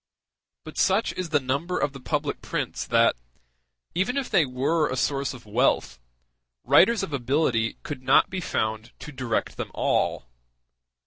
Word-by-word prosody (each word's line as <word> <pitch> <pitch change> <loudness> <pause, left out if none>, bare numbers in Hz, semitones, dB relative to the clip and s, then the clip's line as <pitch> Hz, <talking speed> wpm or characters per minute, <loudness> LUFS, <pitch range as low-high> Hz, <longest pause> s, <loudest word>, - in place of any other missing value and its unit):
But - - -8
such 195 +4 +2
is 185 -2 -4
the 150 -2 +3
number 140 +7 -2
of 145 - 0
the 135 - -9
public - - -2
prints - - -3
that, - - +4 0.8
even 190 +10 0
if 275 - -2
they 155 - +4
were 140 +5 0
a 130 - -2
source 140 +1 0
of 125 -3 -11
wealth, 105 - +1 0.6
writers 225 0 +5
of 165 - -5
ability 125 -3 0
could 145 -4 -6
not 130 +1 +4
be 190 0 -4
found 110 -5 -2
to 150 - -9
direct 130 -4 -2
them - - -4
all. - - 0
140 Hz, 155 wpm, -25 LUFS, 125-175 Hz, 0.8 s, writers